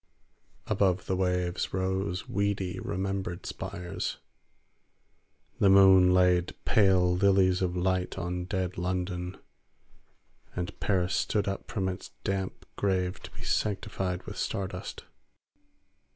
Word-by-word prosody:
Above 95 Hz, -3 st, +1 dB
the 95 Hz, -, 0 dB
waves 90 Hz, -1 st, -1 dB
rose 95 Hz, 0 st, -1 dB
weedy 100 Hz, -2 st, -1 dB
remembered 95 Hz, -2 st, -3 dB
spires. 90 Hz, +1 st, -4 dB, 1.4 s
The 100 Hz, -, +5 dB
moon 95 Hz, -1 st, +7 dB
laid 90 Hz, -1 st, +3 dB
pale 95 Hz, -4 st, +4 dB
lilies 95 Hz, -1 st, +4 dB
of 90 Hz, -1 st, 0 dB
light 95 Hz, 0 st, 0 dB
on 90 Hz, 0 st, -3 dB
dead 95 Hz, -2 st, -2 dB
London, 90 Hz, 0 st, -2 dB, 1.2 s
and 90 Hz, +2 st, -4 dB
Paris 95 Hz, -2 st, +1 dB
stood 105 Hz, -2 st, 0 dB
up 100 Hz, 0 st, -4 dB
from 95 Hz, -5 st, -1 dB
its 90 Hz, -1 st, -5 dB
damp 95 Hz, -1 st, -3 dB
grave 95 Hz, -2 st, 0 dB
to -, -, -9 dB
be -, -, -11 dB
sanctified 95 Hz, -3 st, -1 dB
with -, -, -8 dB
star 95 Hz, -1 st, -1 dB
dust. -, -, -7 dB
95 Hz, 115 wpm, -29 LUFS, 90-95 Hz, 1.4 s, moon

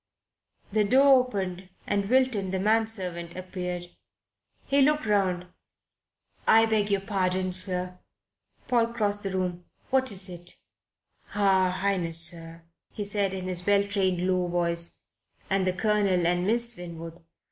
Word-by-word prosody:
The 215 Hz, +1 st, +2 dB
door 265 Hz, +5 st, +6 dB
opened 185 Hz, -4 st, -5 dB, 0.2 s
and 200 Hz, -1 st, -1 dB
Wilton, 255 Hz, -7 st, +2 dB
the 190 Hz, -, -1 dB
man 220 Hz, +3 st, +2 dB
servant, 175 Hz, -5 st, -5 dB
appeared. 180 Hz, -1 st, -6 dB, 0.7 s
He 280 Hz, 0 st, +2 dB
looked 300 Hz, 0 st, +2 dB
round. 190 Hz, -4 st, +1 dB, 1.0 s
"I 225 Hz, 0 st, +6 dB
beg 215 Hz, -2 st, +1 dB
your 200 Hz, -1 st, +1 dB
pardon, 185 Hz, -2 st, -1 dB
sir." 180 Hz, 0 st, 0 dB, 0.7 s
Paul 235 Hz, -2 st, +2 dB
crossed 205 Hz, -3 st, -1 dB
the 195 Hz, -, -3 dB
room. 180 Hz, -2 st, -3 dB, 0.3 s
"What 260 Hz, -1 st, +3 dB
is 190 Hz, -1 st, -1 dB
it?" 175 Hz, -1 st, -4 dB, 0.8 s
"Her 190 Hz, -2 st, +3 dB
Highness, 180 Hz, -3 st, +1 dB
sir," 165 Hz, -1 st, -11 dB, 0.3 s
he 210 Hz, -, -5 dB
said 200 Hz, -1 st, -1 dB
in 185 Hz, -1 st, -5 dB
his 180 Hz, -1 st, -3 dB
well 200 Hz, 0 st, +3 dB
trained, 190 Hz, -3 st, 0 dB
low 185 Hz, -1 st, +1 dB
voice, 170 Hz, -1 st, -1 dB, 0.5 s
"and 190 Hz, -1 st, +2 dB
the 185 Hz, -, +1 dB
Colonel 200 Hz, -3 st, +1 dB
and 175 Hz, +2 st, +1 dB
Miss 235 Hz, +1 st, +3 dB
Winwood. 170 Hz, -1 st, -9 dB
190 Hz, 140 wpm, -27 LUFS, 180-210 Hz, 1.0 s, door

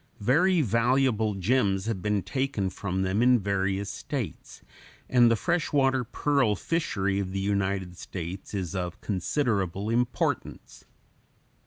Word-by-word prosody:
Very 160 Hz, -, +3 dB
valuable 115 Hz, -2 st, +2 dB
gems 95 Hz, -1 st, +1 dB
have 110 Hz, -5 st, -2 dB
been 105 Hz, -1 st, 0 dB
taken 100 Hz, -3 st, -1 dB
from 95 Hz, -1 st, -2 dB
them 95 Hz, +4 st, 0 dB
in 125 Hz, 0 st, +5 dB
various 100 Hz, -1 st, -1 dB
states, -, -, -6 dB, 0.4 s
and 120 Hz, -2 st, +5 dB
the 115 Hz, -, +4 dB
fresh 170 Hz, +8 st, -1 dB
water 135 Hz, -2 st, +2 dB
pearl 130 Hz, -2 st, +1 dB
fishery 100 Hz, -, -1 dB
of 95 Hz, -1 st, -3 dB
the 95 Hz, -, -1 dB
United 95 Hz, -2 st, -1 dB
States 90 Hz, +3 st, -7 dB
is 95 Hz, -2 st, -3 dB
of 90 Hz, 0 st, -4 dB
considerable 100 Hz, -, -1 dB
importance. 120 Hz, +1 st, -2 dB
105 Hz, 130 wpm, -27 LUFS, 95-125 Hz, 0.4 s, in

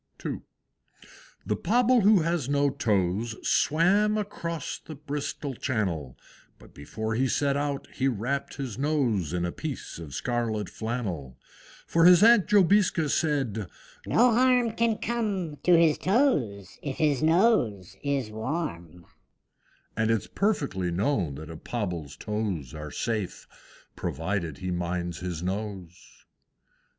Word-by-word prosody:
II. -, -, -3 dB, 1.0 s
The -, -, 0 dB
Pobble 245 Hz, +1 st, +3 dB
who 205 Hz, -2 st, +5 dB
has 165 Hz, -5 st, -1 dB
no 140 Hz, 0 st, +2 dB
toes, 105 Hz, 0 st, 0 dB
Swam 200 Hz, +7 st, +3 dB
across 170 Hz, -6 st, -4 dB
the 155 Hz, -, -10 dB
Bristol 145 Hz, 0 st, -4 dB
Channel; 95 Hz, -, -2 dB, 0.4 s
But -, -, -18 dB
before 110 Hz, +10 st, -4 dB
he 130 Hz, +4 st, +1 dB
set 140 Hz, +2 st, +1 dB
out 145 Hz, -1 st, -2 dB
he 135 Hz, -, 0 dB
wrapped 130 Hz, +3 st, -2 dB
his 130 Hz, -5 st, -5 dB
nose 130 Hz, -, +1 dB
In 90 Hz, 0 st, -1 dB
a 85 Hz, -, -2 dB
piece 145 Hz, -, -6 dB
of 75 Hz, -5 st, -8 dB
scarlet 115 Hz, -3 st, -1 dB
flannel. 95 Hz, -, -4 dB, 0.5 s
For 165 Hz, 0 st, +3 dB
his 180 Hz, +2 st, +8 dB
Aunt 230 Hz, -4 st, +6 dB
Jobiska 190 Hz, -5 st, +4 dB
said, 135 Hz, -, 0 dB, 0.4 s
"No 245 Hz, +1 st, +4 dB
harm 250 Hz, -1 st, +4 dB
Can 225 Hz, -1 st, +1 dB
come 205 Hz, -10 st, -2 dB
to 175 Hz, +2 st, +4 dB
his 165 Hz, -3 st, +4 dB
toes 145 Hz, -, +1 dB
if 140 Hz, -2 st, -4 dB
his 150 Hz, -4 st, +2 dB
nose 160 Hz, -, +2 dB
is 140 Hz, -6 st, -1 dB
warm; 105 Hz, -, -4 dB, 0.9 s
And 110 Hz, 0 st, +1 dB
it's 115 Hz, -2 st, +1 dB
perfectly 140 Hz, -, -1 dB
known 95 Hz, -, 0 dB
that 80 Hz, +3 st, -8 dB
a 80 Hz, -, -8 dB
Pobble's 85 Hz, -, -4 dB
toes 105 Hz, -, -3 dB
Are 75 Hz, 0 st, -6 dB
safe 110 Hz, +3 st, -3 dB, 0.5 s
provided 80 Hz, -1 st, -3 dB
he 95 Hz, 0 st, -4 dB
minds 85 Hz, -1 st, -3 dB
his 90 Hz, -2 st, -4 dB
nose." 95 Hz, -2 st, -6 dB
125 Hz, 130 wpm, -27 LUFS, -, 1.0 s, his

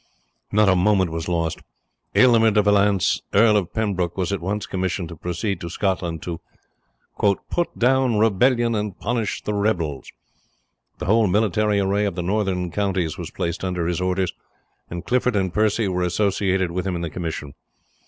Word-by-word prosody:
Not 105 Hz, 0 st, +4 dB
a 95 Hz, -, +5 dB
moment 95 Hz, -1 st, +2 dB
was 80 Hz, 0 st, -4 dB
lost. 85 Hz, -2 st, -1 dB, 0.6 s
Aylmer 115 Hz, -3 st, +6 dB
de 105 Hz, -1 st, +3 dB
Valence, 100 Hz, -2 st, +3 dB
Earl 105 Hz, +1 st, +6 dB
of 100 Hz, -5 st, 0 dB
Pembroke, 95 Hz, -6 st, -1 dB
was 95 Hz, +1 st, -1 dB
at 100 Hz, -, -2 dB
once 100 Hz, +4 st, -2 dB
commissioned 95 Hz, -2 st, -3 dB
to 85 Hz, -, -8 dB
proceed 90 Hz, +3 st, -3 dB
to 85 Hz, -, -5 dB
Scotland, 85 Hz, -3 st, -2 dB
to 85 Hz, -1 st, -5 dB, 1.1 s
"put 175 Hz, -1 st, -1 dB
down 130 Hz, -2 st, +3 dB
rebellion 115 Hz, +3 st, +3 dB
and 105 Hz, -3 st, -3 dB
punish 115 Hz, -2 st, -2 dB
the 105 Hz, -, -2 dB
rebels," 85 Hz, -, -1 dB, 0.9 s
the 90 Hz, -, -5 dB
whole 110 Hz, +3 st, +3 dB
military 105 Hz, +1 st, +2 dB
array 100 Hz, +1 st, +1 dB
of 100 Hz, -4 st, -2 dB
the 90 Hz, -, -3 dB
northern 95 Hz, -2 st, -1 dB
counties 95 Hz, -5 st, -1 dB
was -, -, -5 dB
placed 85 Hz, +1 st, -4 dB
under 90 Hz, -2 st, -1 dB
his 90 Hz, +1 st, -1 dB
orders, 90 Hz, 0 st, 0 dB, 0.6 s
and 85 Hz, 0 st, -6 dB
Clifford 125 Hz, -1 st, +1 dB
and 95 Hz, -3 st, 0 dB
Percy 110 Hz, +1 st, +1 dB
were 90 Hz, -1 st, -1 dB
associated 95 Hz, 0 st, 0 dB
with 90 Hz, +2 st, -3 dB
him 90 Hz, -, -1 dB
in 85 Hz, -, -3 dB
the 85 Hz, -, -3 dB
commission. 80 Hz, -4 st, -5 dB
95 Hz, 170 wpm, -22 LUFS, 90-105 Hz, 1.1 s, Aylmer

